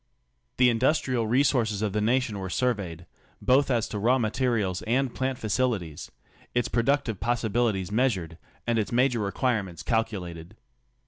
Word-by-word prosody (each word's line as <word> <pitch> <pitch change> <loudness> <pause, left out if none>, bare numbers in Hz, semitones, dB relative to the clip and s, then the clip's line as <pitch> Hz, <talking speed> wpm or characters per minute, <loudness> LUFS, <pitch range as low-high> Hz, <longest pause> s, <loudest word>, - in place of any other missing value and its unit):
The 125 -1 +5
industrial 125 -1 +1
re 125 +5 +3
^ - - 0
sources 110 -6 +1
of 105 -3 -1
the 105 - 0
nation 115 -1 +1
were 95 -1 -4
surveyed 95 -8 -2 0.2
— - - -33
both 135 +2 +3
as 120 -4 +1
to 105 - -4
raw 120 +5 +3
mate 110 -4 -1
^ 130 +2 +1
rials 95 -6 -1
and 130 +2 +1
plant 130 -1 -2
facilities 110 - -2 0.2
— - - -29
its 120 -1 +2
productive 120 -3 +1
possibilities 110 -3 0
meas 125 +3 +3
Sl 95 - -3
ured, 80 0 -10 0.3
and 115 -1 +1
its 105 -3 -2
major 125 0 +2
requirements 100 - -1
calculated. 95 -6 -2
115 Hz, 180 wpm, -27 LUFS, 100-125 Hz, 0.3 s, The